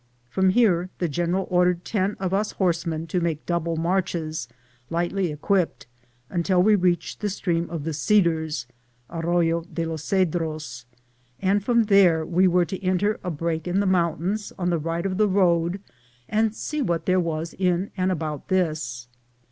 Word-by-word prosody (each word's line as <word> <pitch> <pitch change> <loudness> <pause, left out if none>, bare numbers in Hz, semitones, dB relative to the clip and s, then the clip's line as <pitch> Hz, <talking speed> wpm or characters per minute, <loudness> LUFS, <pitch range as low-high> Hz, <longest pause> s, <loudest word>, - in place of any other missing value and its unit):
From 190 +8 +3
here 185 -4 +3
the 175 - 0
general 175 +4 -1
ordered 180 -1 +2
ten 200 -1 0
of 190 -1 -2
us 210 +2 0
horsemen 165 -3 -1
to 175 +2 -1
make 165 -3 -2
double 170 -1 -1
marches, 165 -4 -1 0.4
lightly 175 +1 -1
equipped, 180 +4 0 0.4
until 180 +3 +2
we 215 +2 +5
reached 180 -4 +1
the 210 - -1
stream 175 -3 -1
of 165 -3 -4
the 160 +1 -3
Cedars 160 - +1 0.5
(arroyo 170 0 +1
de 165 - -2
los 160 -2 -4
Cedros), 160 -9 -1 0.5
and 195 +1 +1
from 235 +1 +3
there 190 -6 +4
we 180 +3 +3
were 180 0 +3
to 190 +2 -6
enter 190 +3 +1
a 180 - -2
break 165 0 -2
in 180 +2 +1
the 200 - +1
mountains 185 +3 0
on 180 -1 0
the 170 - +1
right 165 +3 -3
of 185 -1 -1
the 215 0 +4
road 175 -1 +2 0.5
and 220 0 +1
see 300 +4 -3
what 170 -10 -1
there 185 0 +3
was 165 -1 -2
in 185 +1 0
and 185 -1 +1
about 155 -4 -4
this. 155 -10 -1
175 Hz, 165 wpm, -24 LUFS, 165-190 Hz, 0.5 s, we